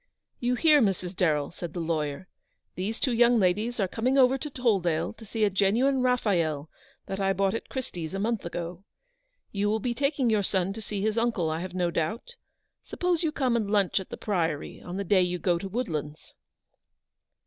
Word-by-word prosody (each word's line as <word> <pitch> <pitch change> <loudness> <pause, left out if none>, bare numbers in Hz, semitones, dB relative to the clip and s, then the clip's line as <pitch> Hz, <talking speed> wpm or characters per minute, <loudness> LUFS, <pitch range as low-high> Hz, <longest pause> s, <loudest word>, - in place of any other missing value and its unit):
"You 245 +1 +1
hear, 300 +1 +5
Mrs. 190 -3 0
Darrell?" 150 -5 +1
said 170 -1 -7
the - - -2
lawyer; 160 0 -2 0.3
" - - -51
these 205 +5 -3
two 255 - +1
young 240 +1 +5
ladies 215 +5 +1
are 195 - +2
coming 250 +8 0
over 260 0 +6
to 300 +3 -5
Toll 245 -7 +2
dale 170 0 -1
to 225 - -13
see 220 +1 -2
a 210 - +4
genuine 230 +8 +2
Raphael 175 - +1 0.3
that 195 - -4
I 195 0 +2
bought 195 0 +1
at 225 - -5
Christie's 180 - -5
a - - -2
month 225 +1 -1
ago. 170 +1 -5 0.7
You 205 0 0
will 220 +1 +1
be 240 +2 -1
taking 275 0 0
your 215 -2 +3
son 190 -1 0
to 225 - -7
see 205 -1 -4
his 220 +1 +1
uncle, 220 -9 0
I 160 - -2
have 180 +1 -6
no 175 -2 +1
doubt 220 - -3 0.2
— - - -53
suppose 355 -2 0
you 320 -3 +1
come 260 -5 +1
and 215 -4 0
lunch 200 -2 +2
at 190 - -8
the - - -6
Priory 165 -8 -2
on 180 +1 -6
the 200 - -1
day 190 0 +4
you 180 0 0
go 175 -1 +1
to 195 - -5
Woodlands." 160 - -4
200 Hz, 210 wpm, -27 LUFS, 175-235 Hz, 0.7 s, over